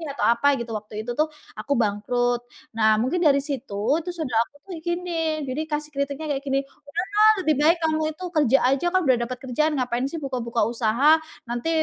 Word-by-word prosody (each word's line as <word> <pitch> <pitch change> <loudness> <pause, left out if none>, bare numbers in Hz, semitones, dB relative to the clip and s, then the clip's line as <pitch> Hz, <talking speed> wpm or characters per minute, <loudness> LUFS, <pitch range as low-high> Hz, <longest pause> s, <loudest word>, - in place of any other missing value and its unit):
atau - - 0
apa 235 +4 +3
gitu 235 -1 -5
waktu 210 +1 -12
itu - - -1
tuh 310 - +4 0.3
aku 285 - -6
bangkrut, 240 +4 0 0.4
nah 220 -1 +4
mungkin 265 +9 0
dari 280 -3 +5
situ, 275 -7 -5 0.2
itu 345 +2 -6
saudara 260 -10 -1
aku - - -35
tuh - - -9
gini, 340 -2 -1
jadi 260 +4 -2
kasih 295 0 -2
kritiknya 280 +2 -2
kayak 270 - -5
gini, 275 0 +1 0.6
"Udahlah, 430 +1 +7
lebih 310 -2 +2
baik 335 +2 +5
kamu 315 -1 +1
itu 315 +4 -11
kerja 270 -4 +4
aja, 275 +5 +1
kan 370 - +4
udah 255 -2 +5
dapet 250 +1 -5
kerjaan, 285 +5 +1
ngapain 250 0 -1
sih 330 - -4
buka-buka 240 -4 -2
usaha. 240 +6 +4 0.3
Nanti 240 +6 -2
275 Hz, 195 wpm, -24 LUFS, 240-315 Hz, 0.6 s, Udahlah